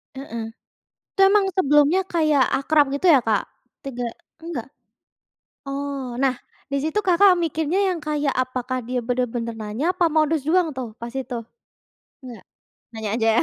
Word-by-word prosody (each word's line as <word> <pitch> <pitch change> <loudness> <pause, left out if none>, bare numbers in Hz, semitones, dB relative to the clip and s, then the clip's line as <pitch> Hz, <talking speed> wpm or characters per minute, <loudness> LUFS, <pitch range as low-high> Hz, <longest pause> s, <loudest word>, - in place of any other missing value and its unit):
Heeh, 235 -4 -6 0.7
itu 390 - 0
emang 390 +1 +5
sebelumnya 295 +1 +4
kayak 310 -5 +3 0.2
akrab 295 +1 +3
gitu 330 - -4
ya, 275 - +6
Kak? 220 -3 +1 0.4
Tegak 245 -3 -4 0.3
enggak? 325 -9 -5 1.0
Oh, 275 -2 -4
nah, 265 -2 +2 0.3
di 280 - -2
situ 315 +8 0
Kakak 370 -1 +4
mikirnya 320 +2 0
yang 355 -3 -2
kayak, 295 -2 -1
apakah 255 -1 -2
dia 250 +1 -2
benar-benar 240 -1 -2
nanya, 215 +5 -4
apa 360 - +2
modus 310 -2 +2
doang 345 +2 +2
tuh 245 -4 -5
pas 235 0 -6
itu? 250 -2 -4 0.8
Enggak? 245 -3 -10 0.5
Nanya 220 -1 -4
aja, 225 -1 +2
275 Hz, 145 wpm, -23 LUFS, 245-320 Hz, 1.0 s, ya